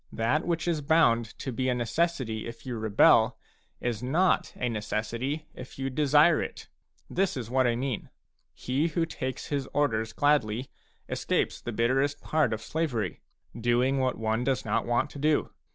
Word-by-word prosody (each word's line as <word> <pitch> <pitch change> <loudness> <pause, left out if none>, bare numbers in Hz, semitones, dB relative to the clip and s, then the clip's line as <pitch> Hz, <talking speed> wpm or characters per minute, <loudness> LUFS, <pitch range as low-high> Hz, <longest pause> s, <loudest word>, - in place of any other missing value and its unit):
That 130 +9 0
which 170 -1 -1
is 165 -3 0
bound 140 -6 +4
to 135 - -4
be 130 +2 -1
a 125 - +1
necessity 120 -2 -1
if 115 +2 -10
you 125 -2 -4
rebel, 110 +1 +4 0.4
is 120 -3 -2
not 160 +9 +2
a 125 - -2
necessity 115 +6 -3
if 130 - -10
you 135 0 -2
desire 150 +3 +4
it. - - -6 0.4
This 185 -4 0
is 120 -2 -5
what 130 -1 +3
I 120 - +1
mean: 125 -2 -3 0.5
he 135 +6 0
who 165 0 0
takes 130 -5 -5
his 140 -2 -1
orders 115 -6 +1
gladly, 130 -4 +1 0.4
escapes - - -1
the 120 - -4
bitterest 135 +6 +1
part 155 +1 +1
of 110 0 -3
slavery, 120 - -2 0.2
— 120 - -13
doing 130 +3 +3
what 130 -1 0
one 110 +1 0
does 130 0 0
not 115 +1 0
want 120 +5 +1
to 140 - -9
do. 150 +1 +1
130 Hz, 170 wpm, -28 LUFS, 115-145 Hz, 0.5 s, bound